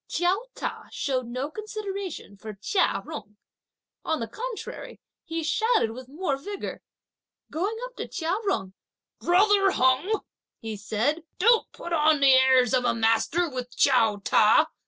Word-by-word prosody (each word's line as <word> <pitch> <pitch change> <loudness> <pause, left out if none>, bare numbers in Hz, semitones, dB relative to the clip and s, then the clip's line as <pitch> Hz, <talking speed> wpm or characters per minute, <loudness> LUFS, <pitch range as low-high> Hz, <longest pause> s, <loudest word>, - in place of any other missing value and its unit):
Chiao 370 +7 0
Ta - - -5
showed 255 -3 -2
no 255 +5 -4
consideration 400 - -6
for 215 +1 -9
Chia 370 - 0
Jung. 210 -10 -9 0.7
On 320 -1 -1
the 230 - -3
contrary, 475 - -7 0.3
he 330 0 -3
shouted 435 - +2
with 255 +2 -10
more 295 -1 -2
vigour. 400 +8 -6 0.7
Going 395 +8 -2
up - - -12
to - - -4
Chia 335 -1 -2 0.2
Jung: 190 - -2 0.5
"Brother 395 +2 +4
Jung," 265 +8 +2 0.4
he 220 -1 -5
said, 220 +10 -1 0.2
"don't 460 +4 +3
put 345 - -7
on 310 -1 +4
the 275 -1 +6
airs 260 -2 +5
of 255 -1 +3
a 245 - +1
master 225 +10 +2
with 250 -3 -7
Chiao 230 -6 +4
Ta. 210 +2 +4
300 Hz, 145 wpm, -26 LUFS, 245-385 Hz, 0.7 s, the